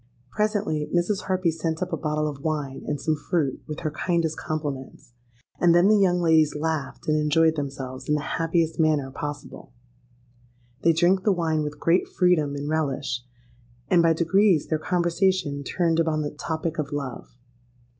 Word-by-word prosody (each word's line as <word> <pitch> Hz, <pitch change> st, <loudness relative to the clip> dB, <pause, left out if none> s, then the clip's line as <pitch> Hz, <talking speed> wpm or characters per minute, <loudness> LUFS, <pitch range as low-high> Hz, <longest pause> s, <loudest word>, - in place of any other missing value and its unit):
Presently 210 Hz, -8 st, -1 dB
Mrs. 180 Hz, +3 st, 0 dB
Harpy 185 Hz, -3 st, +1 dB
sent 160 Hz, +1 st, -2 dB
up 180 Hz, -, -6 dB
a -, -, +3 dB
bottle 150 Hz, -1 st, -1 dB
of 145 Hz, -2 st, -5 dB
wine 150 Hz, -4 st, -3 dB
and 145 Hz, -1 st, -2 dB
some 155 Hz, +2 st, 0 dB
fruit, 150 Hz, -1 st, -1 dB
with 150 Hz, 0 st, -6 dB
her 155 Hz, -2 st, -2 dB
kindest 165 Hz, 0 st, -1 dB
compliments; 145 Hz, -6 st, -5 dB, 0.5 s
and 170 Hz, -1 st, +5 dB
then 175 Hz, +3 st, +5 dB
the 215 Hz, -, +6 dB
young 185 Hz, -3 st, +3 dB
ladies 160 Hz, -3 st, +3 dB
laughed 155 Hz, -2 st, -3 dB
and 155 Hz, 0 st, +2 dB
enjoyed 160 Hz, +2 st, +3 dB
themselves 135 Hz, -2 st, -5 dB
in 150 Hz, -, +3 dB
the 150 Hz, -, -1 dB
happiest 165 Hz, 0 st, 0 dB
manner 150 Hz, -4 st, +2 dB
possible. 145 Hz, -1 st, -7 dB, 1.1 s
They 165 Hz, -, +5 dB
drank 175 Hz, +4 st, +3 dB
the 210 Hz, -, +3 dB
wine 165 Hz, -4 st, 0 dB
with 150 Hz, 0 st, -5 dB
great 170 Hz, +2 st, +2 dB
freedom 155 Hz, -6 st, +2 dB
and 145 Hz, 0 st, -4 dB
relish; 140 Hz, -5 st, -1 dB, 0.7 s
and 175 Hz, -2 st, +5 dB
by 165 Hz, -1 st, +4 dB
degrees 175 Hz, +1 st, +2 dB
their 155 Hz, -, 0 dB
conversation 175 Hz, -3 st, 0 dB
turned 165 Hz, +2 st, 0 dB
upon 160 Hz, -2 st, +1 dB
the 145 Hz, -, -3 dB
topic 160 Hz, +1 st, -4 dB
of 150 Hz, 0 st, -3 dB
love. 135 Hz, -4 st, -6 dB
160 Hz, 165 wpm, -25 LUFS, 150-175 Hz, 1.1 s, the